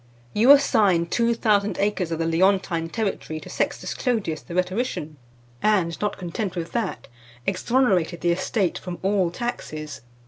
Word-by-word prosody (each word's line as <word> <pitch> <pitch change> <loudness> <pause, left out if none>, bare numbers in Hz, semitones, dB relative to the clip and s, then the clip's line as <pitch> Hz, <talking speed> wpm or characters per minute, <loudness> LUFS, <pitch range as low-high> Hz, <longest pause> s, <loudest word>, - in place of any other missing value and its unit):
You 230 +5 +3
assigned 200 -12 +5
two 235 0 +2
thousand 210 -3 +1
acres 200 -4 0
of 165 - -1
the 165 - -1
Leontine 170 -1 +2
territory 195 -7 -3
to - - -11
Sextus - - -2
Clodius, 215 - -1
the 175 - -9
rhetorician, 180 - -2 0.4
and 185 -6 +2
not 210 - -1
content 185 +2 -4
with 170 -2 -4
that, 215 - -3 0.4
exonerated 190 -4 +1
the 175 - +2
estate 185 +1 0
from 180 -2 -6
all 190 -2 +2
taxes. 155 -8 -5
190 Hz, 145 wpm, -24 LUFS, 170-215 Hz, 0.4 s, assigned